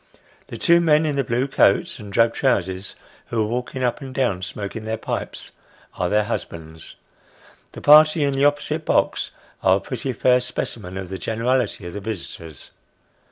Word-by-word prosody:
The - - -7
two 170 -1 +4
men 155 -1 +4
in 150 -2 -1
the 140 - +1
blue 120 +3 0
coats 100 -7 +2
and 105 -1 -9
drab 115 +3 +3
trousers, 95 -7 -1 0.3
who 115 -2 0
are - - 0
walking 125 +3 -3
up 125 +3 0
and 135 -1 -8
down, 120 -9 0
smoking 100 +4 -5
their 110 +1 -3
pipes, - - -5 0.4
are 90 - -1
their 105 +2 +3
husbands. 80 -7 -6 0.8
The - - -9
party 155 +1 +7
in 140 -1 +1
the 135 +1 +2
opposite 145 0 0
box - - +1 0.3
are 95 0 +4
a - - -4
pretty 130 +4 -4
fair 125 +2 +3
specimen 105 -6 -4
of 95 -2 -6
the 95 0 -5
generality 115 -2 -1
of 85 - -7
the 105 - -6
visitors. 85 -7 -7
115 Hz, 175 wpm, -22 LUFS, 95-135 Hz, 0.8 s, party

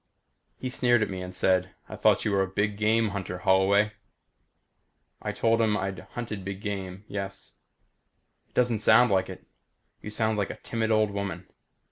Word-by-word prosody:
He 130 - -4
sneered 120 -3 +3
at 105 - -3
me 95 -1 -4
and 90 0 -6
said, 90 0 +1
"I - - -7
thought - - +3
you - - +1
were 100 -1 +2
a 95 - +1
big 105 +2 -1
game 110 +1 +2
hunter, 95 -3 -4
Holloway?" 95 +3 +3 1.3
I - - -2
told 115 0 +2
him 105 -2 +2
I'd 95 -1 -3 0.2
hunted 110 -5 -4
big 95 0 -5
game 100 -1 -5
yes. 100 -1 -6 0.9
"It - - -38
doesn't 120 -3 +2
sound 125 +2 +5
like 95 -1 +2
it. - - -9 0.6
You - - -7
sound 110 0 0
like 100 - -1
a - - -6
timid 110 -1 -2
old 110 -1 +3
woman. 100 -3 -4
100 Hz, 175 wpm, -27 LUFS, 95-110 Hz, 1.3 s, sound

